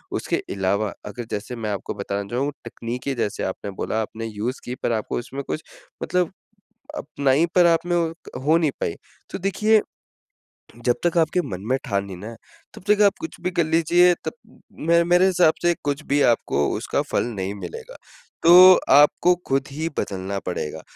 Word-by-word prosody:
उसके - - -1 0.2
अलावा 100 +2 0
अगर 115 +3 -6
जैसे 105 +4 -4
मैं 115 -2 -4
आपको 100 - -4
बताना 100 0 -4
चाहूँ 135 +4 -1
तकनीकी 120 +3 -4
जैसे 115 -4 -2
आपने 95 +1 -4
बोला 110 - -1
आपने 110 +1 -6
यूज़ 110 +4 -4
की 125 - -4
पर - - +1
आपको 110 -1 -2
उसमें 135 +3 -6
कुछ 155 - -4 0.4
मतलब 180 -2 0 0.7
अपनाई 140 +4 +1
पर 180 -1 +6
आप 170 0 +2
में 175 0 +1 0.5
हो 155 +3 +4
नहीं 155 -4 +1
पाई। 85 - -1 0.4
तो - - -5
देखिए 210 +3 +2 1.0
जब 120 0 +3
तक 175 0 +1
आपके 165 +2 +2
मन 95 - -6
में 130 - +2
ठान 100 -4 -1
ली 95 - -7
ना 110 +6 -8 0.4
तब - - -12
तक 210 0 +4
आप 200 - +4
कुछ 325 - -6
भी 180 - -1
कर 170 - +1
लीजिए 170 +3 +4
तब - - -3 0.5
मैं 170 0 +5
मेरे 175 +2 +4
हिसाब 180 -4 +4
से 175 0 +3
कुछ 145 +1 -2
भी 145 +1 +2
आपको 75 -9 -1
उसका - - -1
फल - - +1
नहीं 95 +1 -3
मिलेगा। 90 -4 -9 0.5
तो 165 - +6 0.4
आपको 150 +5 +5
खुद 135 0 0
ही 160 +3 -3
बदलना 95 0 -3
पड़ेगा। 90 -4 -4
135 Hz, 180 wpm, -23 LUFS, 105-170 Hz, 1.0 s, पर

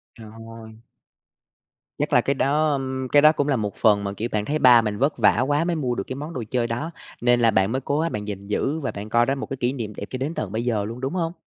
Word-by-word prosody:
Trời 110 -2 -12 0.2
ơi! 115 -1 -11 1.3
Chắc - - -2
là - - +6
cái 140 - 0
đó 150 +3 +1
ưm, 130 -1 -3
cái 145 - +6
đó 155 +1 +7
cũng 145 -2 -1
là 140 - +2
một 105 -3 -3
phần 105 -3 +3
mà, 100 0 -3
kiểu, 115 +4 -4
bạn 105 -1 -1
thấy 155 +1 -1
ba 120 -2 +7
mình 105 -2 -3
vất 140 +2 0
vả 110 +1 +4
quá 145 +2 +1
mới 170 -1 -1
mua 125 -5 -1
được 100 - -3
cái 130 - -5
món 150 +4 -7
đồ 125 - -4
chơi 120 -2 0
đó, 145 +9 -4 0.3
nên 120 0 +3
là 115 -1 +4
bạn 95 +2 +2
mới 130 +1 -1
cố 145 +3 -1
gắng 165 +1 0
bạn 105 0 -5
gìn 100 -1 -6
giữ 135 +9 -1
và 135 - -3
bạn 105 +2 -8
coi 120 +1 +3
đó 135 +2 0
một 135 - -5
cái 135 - -4
kỷ 125 +1 0
niệm 110 -5 -5
đẹp 100 - -6
cho 130 - -4
đến 140 +5 -3
tận 100 - -4
bây 115 +2 -3
giờ 105 -4 0
luôn, 115 +3 -7
đúng 135 +6 -3
hông? 170 -2 -2
125 Hz, 295 wpm, -23 LUFS, 110-140 Hz, 1.3 s, đó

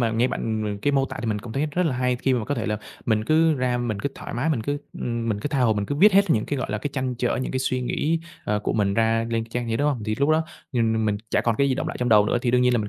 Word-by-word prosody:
mà 115 -2 +2
nghe 115 +3 +2
bạn, 110 -3 -2
ừm, 105 -1 -2
m - - -8
cái 145 +8 0
mô 135 -1 +3
tả - - -7
thì 120 - -4
mình 105 -2 0
cũng 110 +2 -8
thấy 140 +5 0
rất 175 +4 +1
là 135 -6 -1
hay 125 0 +1
khi 130 +1 +1
mà 120 -3 -1
có 145 - -1
thể - - -3
là 105 -1 0 0.3
mình 110 -2 +1
cứ 160 +4 +4
ra 125 -2 0
mình 120 -4 -2
cứ 140 - -1
thoải - - -7
mái, 120 +7 0
mình 125 -8 0
cứ, 145 +5 -2 0.2
ưm, 115 -1 -2
mình 105 -2 -1
cứ 145 - -2
tha 140 -2 0
hồ 120 -3 +4
mình 105 -1 -2
cứ 145 - -2
viết 200 +8 +6
hết 200 -1 +4
những 110 -7 +2
cái, 145 - -2
gọi - - -3
là, 105 - -1
cái 145 - -4
trăn 130 -2 -2
trở, 120 0 0
những - - -4
cái 130 - 0
suy 130 -1 0
nghĩ, 155 +6 0 0.3
ờ, 105 0 0
của 105 - -2
mình 100 -2 +1
ra 115 +1 +2
lên 115 -1 0
cái 115 - -19
trang 120 0 -3
giấy, 115 - 0
đúng 145 +3 +2
hông? 130 -6 -1
Thì 110 0 -1
lúc 140 +1 +2
đó, 160 +1 +3 0.3
ừm, 110 -3 +1
mình 105 -1 +1
chả - - +2
còn 115 -2 0
cái 140 - +3
gì 130 - +1
đọng - - -2
lại - - -5
trong 125 - +1
đầu 105 -2 +6
nữa - - +1
thì 120 - +1
đương 125 0 +3
nhiên 125 0 +4
là 120 - +3
mình 105 -1 -2
120 Hz, 365 wpm, -24 LUFS, 110-140 Hz, 0.3 s, viết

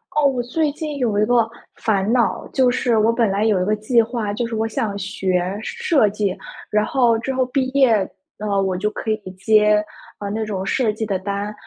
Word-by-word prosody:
哦， 300 - +3
我 255 -3 -1
最 295 +4 0
近 305 -2 -5
有 225 -5 0
一 210 - +3
个 235 -1 +2 0.3
烦 205 -1 0
恼， 240 -2 +1
就 260 -2 +4
是 245 -2 +1
我 220 +1 +4
本 230 -2 +1
来 200 +2 0
有 205 -5 +2
一 - - 0
个 215 - +1
计 215 +3 +2
划， 225 -2 -3
就 235 +3 -2
是 230 -1 -4
我 220 +1 0
想 220 -3 -2
学 190 -1 -1
设 340 - +2
计， 200 -2 -2 0.3
然 210 0 +2
后 240 -4 +2
之 265 +4 -3
后 260 0 +1
毕 260 0 0
业， 265 -3 +4 0.4
呃， 205 -2 0
我 190 -1 -1
就 210 +3 -1
可 220 - -5
以 215 - +1
接， 210 +2 +3 0.4
啊， 205 - -4
那 220 +2 -2
种 195 -3 -3
设 225 +2 +1
计 220 - -4
的 200 -3 -1
单， 200 +2 -4
220 Hz, 230 characters per minute, -21 LUFS, 205-245 Hz, 0.4 s, 就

